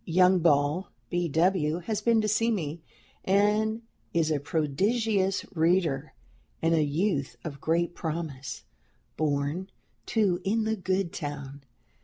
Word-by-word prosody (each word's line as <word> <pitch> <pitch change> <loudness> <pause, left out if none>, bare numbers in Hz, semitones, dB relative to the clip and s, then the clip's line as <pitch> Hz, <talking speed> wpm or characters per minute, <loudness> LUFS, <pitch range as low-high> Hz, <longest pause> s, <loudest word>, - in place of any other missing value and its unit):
Young 180 +2 +4
Ball 150 +2 +2 0.2
(B. 175 -1 0
W.) 160 0 +2
has 215 +3 -2
been 230 -2 +3
to 215 - 0
see 225 +2 +2
me, 165 -7 -2 0.4
and 210 +3 +2 0.3
is 160 -2 +2
a 150 - +1
prodigious 190 - 0
reader 160 -4 +1 0.5
and 165 0 +2
a 160 - +4
youth 145 -3 0
of 140 -3 -7
great 170 +2 +1
promise, 155 -6 -5 0.5
born, 150 +5 -1 0.4
too, 195 -5 +1
in 220 +3 +1
the 220 0 0
good 185 -2 -1
town. 145 -2 -6
170 Hz, 130 wpm, -28 LUFS, 150-195 Hz, 0.5 s, Young